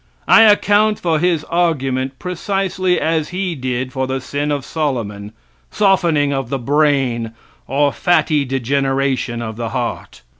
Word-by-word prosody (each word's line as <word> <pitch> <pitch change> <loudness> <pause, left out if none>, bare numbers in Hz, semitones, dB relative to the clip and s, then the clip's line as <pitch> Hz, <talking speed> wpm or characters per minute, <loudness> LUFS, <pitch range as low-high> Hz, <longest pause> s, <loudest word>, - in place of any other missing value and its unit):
I - - +7
account 210 0 +4
for 165 -3 0
his 170 -2 +1
argument 135 -7 -1
precisely 185 0 -1
as 160 -1 0
he 185 0 -2
did 130 -2 -3
for 130 0 -2
the 130 0 -2
sin 145 +3 -3
of 145 -2 -2
Solomon, 115 -10 -3 0.4
softening 170 -8 +2
of 135 -3 -3
the 135 - -1
brain, 135 -4 +1 0.3
or 140 +2 +1
fatty 155 -4 +2
degeneration 135 -2 -1
of 110 -1 -6
the 115 -1 -3
heart. 65 - -5
140 Hz, 140 wpm, -18 LUFS, 130-170 Hz, 0.4 s, I